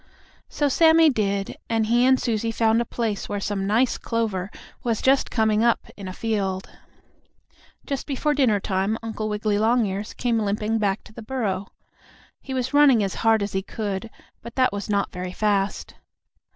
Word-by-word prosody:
So 290 - 0
Sammie 320 +2 +5
did, 200 -4 -1
and 225 -1 +1
he 240 +3 +3
and 260 0 +4
Susie 230 -1 -1
found 225 0 +2
a - - -2
place 225 -5 -3
where 205 - -2
some 195 -1 -2
nice 230 +5 +2
clover 210 -5 -2 0.3
was 230 -4 0
just 270 +1 +2
coming 220 -1 +2
up 235 0 +1
in 200 -2 -8
a - - -5
field. 195 -2 -2 1.2
Just 275 -2 -4
before 295 +1 0
dinner 250 -8 +3
time 195 +3 -1
Uncle 220 -1 -4
Wiggily 210 0 0
Longears 215 -3 0
came 235 -2 0
limping 210 +1 -1
back 200 -1 0
to 215 - -16
the 235 - -9
burrow. 210 -5 -2 0.7
He 265 - -6
was 255 +1 -2
running 280 -7 +6
as 195 - -2
hard 225 -2 +3
as 200 - -4
he 190 - 0
could, 205 +1 -4 0.3
but 235 - -10
that 255 -4 +2
was 200 -1 -5
not 200 -1 0
very 180 0 -5
fast. 205 -1 -1
220 Hz, 175 wpm, -24 LUFS, 200-240 Hz, 1.2 s, running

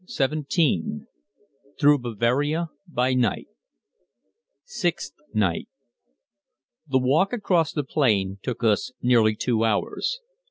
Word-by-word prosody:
] - - -30
CHAPTER 140 +2 -1
XVII 165 -4 +3 1.0
THROUGH 145 -1 +5
BAVARIA 125 +8 0 0.2
BY 130 -5 0
NIGHT 125 -2 0 1.2
Sixth 175 - -3 0.2
night. 100 -6 0 1.2
The 135 -2 +2
walk 140 +10 +2
across 180 -9 +1
the 150 - -2
plain 100 -9 +1
took 125 +1 -5
us 110 +2 +1
nearly 115 -3 +4
two 115 0 0
hours. 115 - -1
130 Hz, 110 wpm, -24 LUFS, 115-160 Hz, 1.2 s, THROUGH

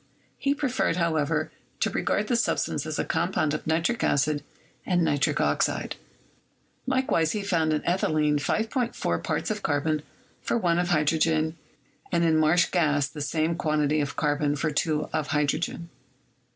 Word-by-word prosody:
He 280 0 +1
preferred, 265 - 0
however, 160 -2 0 0.3
to - - +1
regard 210 - 0
this 235 +1 +1
substance - - -1
as - - -3
a - - -1
compound 150 -2 0
of 155 - -4
nitric 170 +9 0
acid 145 0 +1 0.4
and 175 -2 +1
nitric 145 -3 +1
oxide. - - 0 0.9
Likewise, 260 -12 +1
he 210 -2 -2
found 165 -5 +1
in 150 - +1
ethylene 155 -4 +2
5.4 220 - -1
parts - - -1
of - - -3
carbon 150 +1 0 0.4
for - - 0
1 175 -5 +1
of 175 - 0
hydrogen, 160 0 +2 0.6
and 170 -2 +2
in 165 -1 +3
marsh 160 +3 +4
gas 145 -5 +2
the 145 +2 -8
same 155 +3 0
quantity 150 -2 +1
of 145 - -3
carbon 145 -1 +1
for 155 +2 -1
2 150 0 0
of 155 -2 -1
hydrogen. 150 +3 -1
155 Hz, 150 wpm, -26 LUFS, 150-175 Hz, 0.9 s, marsh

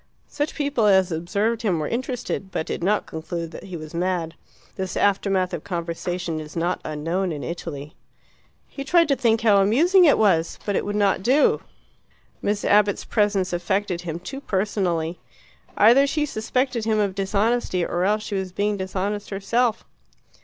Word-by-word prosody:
Such 290 +1 -3
people 280 -7 +1
as 190 -2 +4
observed 200 +8 -1
him 195 -7 +1
were 155 - -2
interested, 240 -5 -3
but 160 - -2
did - - -4
not 205 +3 +1
conclude 165 +1 -5
that - - -9
he 185 -3 -6
was 155 0 -9
mad. 170 -1 -1 0.4
This 190 -1 -4
aftermath 195 -2 +1
of - - -4
conversation 170 -1 -3
is 155 -1 -9
not 175 +2 -1
unknown 165 +5 -2
in 150 -2 -5
Italy. 155 -4 -6 0.7
He 275 - -7
tried 335 +3 +4
to 275 - +4
think 230 -3 +2
how 215 -3 +5
amusing 335 - +5
it 295 - +5
was; 170 -6 +2
but 205 - -1
it - - 0
would 205 0 -3
not 200 -2 +2
do 260 +8 +3 0.8
Miss 205 0 -1
Abbott's 205 -1 +3
presence 200 -4 +1
affected 190 0 -1
him 170 -2 -4
too 270 +10 -7
personally. 185 - -1 0.6
Either 245 +7 +6
she 300 +1 0
suspected 250 0 -1
him 220 -1 +1
of 205 -2 +1
dishonesty, 200 -1 0
or 175 +1 -1
else 210 +2 +1
she 210 - -6
was 190 -2 -2
being 205 +2 -1
dishonest 195 +2 -3
herself. 225 +4 0
195 Hz, 165 wpm, -23 LUFS, 175-220 Hz, 0.8 s, Either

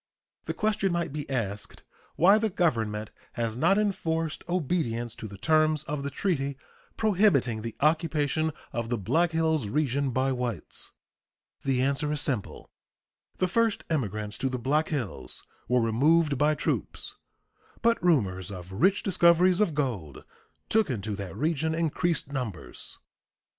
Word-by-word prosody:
The - - -3
question 210 -3 +1
might 170 -4 -1
be 150 -2 -5
asked 105 -6 -4 0.3
why 195 +6 +6
the 220 0 +1
Government 110 - 0 0.2
has 115 -2 -2
not 170 +10 +3
enforced 165 -6 -1
obedience 135 -10 -1
to 110 - -7
the 100 -1 -10
terms 155 +4 +3
of 150 -1 -3
the 140 - -3
treaty 140 -5 -1 0.4
prohibiting 185 - +3
the 115 0 -5
occupation 155 0 +1 0.2
of 115 -1 -2
the 120 - 0
Black 165 - +2
Hills 160 -6 +1
region 140 +2 0
by 130 +2 +1
whites. 125 -8 -4 0.7
The 130 -2 +1
answer 140 +2 0
is 150 - -1
simple: 125 -7 -2 0.7
The 185 - +2
first 225 +3 +1
immigrants 105 - -2
to 135 - 0
the 130 - -2
Black 145 +6 +1
Hills 135 - -4 0.2
were 125 +1 +3
removed 145 +7 +3
by 150 +3 +3
troops, - - -3 0.7
but 230 -6 +3
rumors 100 - +2
of 90 -2 -8
rich 190 - +2
discoveries 180 0 +4
of 175 -8 +1
gold 110 - -3 0.4
took 220 -5 +2
into 105 -4 -2
that 95 -4 -6
region 160 +1 0
increased 165 -2 0
numbers. 125 - -4
145 Hz, 140 wpm, -28 LUFS, 115-170 Hz, 0.7 s, why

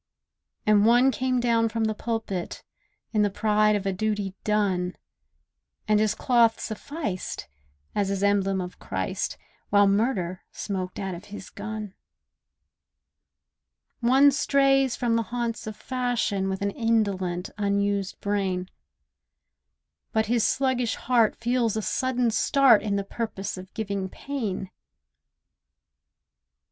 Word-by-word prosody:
And 210 -1 +5
one 245 +4 +5
came 255 +1 0
down 230 -1 +2
from 225 0 -1
the 220 0 +1
pulpit, 220 -5 -4 0.5
In 215 - +3
the 205 - +3
pride 210 +1 +2
of 200 -1 -2
a 195 - 0
duty 205 -1 -1
done, 190 -4 0 0.9
And 215 0 +4
his 215 -1 +2
cloth 235 -3 +3
sufficed, 220 - -5 0.5
as 200 -1 0
his 200 0 -1
emblem 195 -1 +2
of 180 0 -7
Christ, - - -3 0.3
While 205 0 +5
murder 195 -3 0
smoked 185 -3 -4
out 190 -2 -3
of 175 +3 -9
his 205 -2 -9
gun. 215 -1 -6 2.1
One 265 +4 +5
strays 270 -2 +3
from 235 -2 0
the - - +2
haunts 235 -2 -3
of 215 - -5
fashion 235 -5 -1
With 190 +1 -3
an 200 - 0
indolent, 195 -6 0
unused 200 -1 0
brain; 195 -3 -1 1.4
But 220 -1 +2
his 230 0 +1
sluggish 260 -3 +1
heart 235 -3 +2
feels 235 -2 0
a - - 0
sudden 250 -1 0
start 265 -1 +5
In 205 -2 -1
the 200 - 0
purpose 205 -1 -4
of 185 0 -10
giving 200 -3 -3
pain. 210 -8 -4
215 Hz, 125 wpm, -26 LUFS, 195-235 Hz, 2.1 s, And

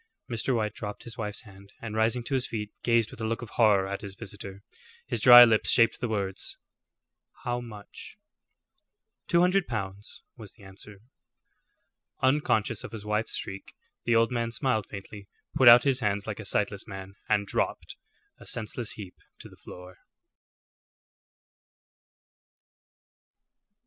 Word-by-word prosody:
Mr. 120 +2 -1
White 105 -2 -1
dropped 105 -1 -7
his 120 - -9
wife's 105 -3 -5
hand, 100 -1 -16
and 110 -2 -7
rising 115 +2 +1
to 125 - -5
his 130 -2 0
feet, 105 -2 -5
gazed 115 -2 +2
with - - -11
a 110 - -1
look 115 +2 -3
of 115 - -10
horror 105 -4 +3
at 100 0 -5
his 100 -2 -8
visitor. 100 -2 -9 0.4
His - - -3
dry 120 -1 +11
lips 110 -2 +2
shaped 115 -1 +4
the 120 - -2
words, 100 -3 -3 0.9
"How 120 0 -2
much?" 110 -4 -11 1.1
"Two 170 - +3
hundred 180 +1 +2
pounds," 100 -2 -6
was 110 -5 -11
the 105 - -19
answer. 95 +1 -13 1.2
Unconscious 130 -6 +1
of - - -9
his 105 -2 -8
wife's 105 +1 -1
shriek, 95 +1 -7 0.3
the 120 - +2
old 115 +2 +3
man 115 -1 -1
smiled 115 -4 -1
faintly, 100 0 -10 0.3
put 130 - +4
out 120 +1 +10
his 135 -2 +1
hands 105 -3 -1
like 110 -1 -5
a 110 - -7
sightless 100 +1 -1
man, 95 -1 -8 0.2
and 105 -2 +2
dropped, - - -2 0.4
a - - -14
senseless 115 +1 -3
heap, 100 -4 -10 0.2
to - - -11
the - - -16
floor. 90 0 -12
110 Hz, 150 wpm, -27 LUFS, 100-120 Hz, 1.2 s, dry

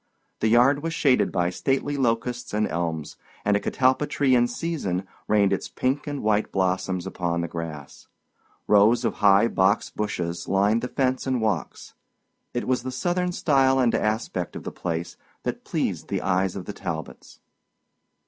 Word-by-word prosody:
The - - +1
yard 125 +5 +4
was 165 +1 -3
shaded 135 -6 +3
by 90 0 0
stately 135 +8 -1
locusts 120 -3 -1
and 105 0 +1
elms, 80 -2 -3 0.3
and 105 0 +3
a - - +3
catalpa 130 +6 +1
tree 135 -3 +2
in 120 -1 +4
season 110 - -3 0.2
rained 100 -2 +3
its 95 - -3
pink 135 +4 -1
and 145 -1 -4
white 105 0 +1
blossoms 95 -1 0
upon 85 -3 -2
the 85 - -2
grass. 80 -4 -7 0.6
Rows 110 +4 +5
of - - -1
high 100 +2 +6
box 100 -1 +1
bushes 85 -5 -3
lined 100 +4 +2
the - - -2
fence 130 0 -1
and 130 -2 +1
walks. 105 -7 -2 0.6
It 120 - -3
was 130 -1 +1
the 130 +1 -5
Southern 180 +7 -1
style 135 -6 +3
and 125 -3 +3
aspect 105 -5 -1
of - - -6
the - - -5
place 85 -1 -4 0.3
that - - -4
pleased - - -2
the - - -2
eyes 95 0 +1
of 95 -2 -6
the 105 - -6
Talbots. 80 -5 -7
105 Hz, 165 wpm, -25 LUFS, 90-130 Hz, 0.6 s, high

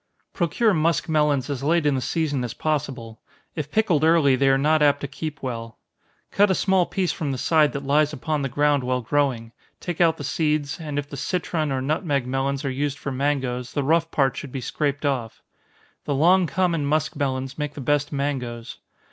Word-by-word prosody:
_ - - -53
Procure 205 +5 +1
muskmelons 155 -4 +1
as 140 -4 -4
late 160 +3 +2
in 145 - +3
the 130 - -1
season 145 0 -1
as 120 0 -5
possible 135 -8 -3 0.3
if 155 -4 -5
pickled 195 -9 +2
early, 160 -4 +5
they 135 +1 +2
are 135 - +4
not 155 +3 +2
apt 145 -1 +4
to 140 - -3
keep 155 +1 -6
well. 115 -3 -5 0.5
Cut 205 0 +4
a 190 - +2
small 190 -2 +2
piece 185 -5 -1
from 150 -2 -3
the 130 - -3
side 155 +2 +3
that 140 -1 -5
lies 150 +2 +3
upon 150 +1 -2
the 135 - -2
ground 145 0 +2
while 125 0 -1
growing, 125 -3 0 0.3
take 175 -1 -4
out 165 -2 +4
the 145 - -7
seeds, 150 +1 -1
and 150 -3 -5
if 145 0 -2
the 140 - -8
citron 160 -1 -2
or 130 -1 -1
nutmeg 145 -2 0
melons 135 +2 -2
are 135 - 0
used 140 +1 -2
for 140 - -5
mangoes, 130 -2 -2
the 145 - 0
rough 165 +3 +2
part 135 -5 +1
should 140 - -7
be 135 - -4
scraped 145 +3 -2
off. 125 -6 -2 0.6
The 145 - -1
long 175 +5 +4
common 170 0 0
muskmelons 140 -2 -1
make 150 -1 -3
the - - -7
best 145 +2 0
mangoes. 125 -5 -4
145 Hz, 200 wpm, -23 LUFS, 135-155 Hz, 0.6 s, early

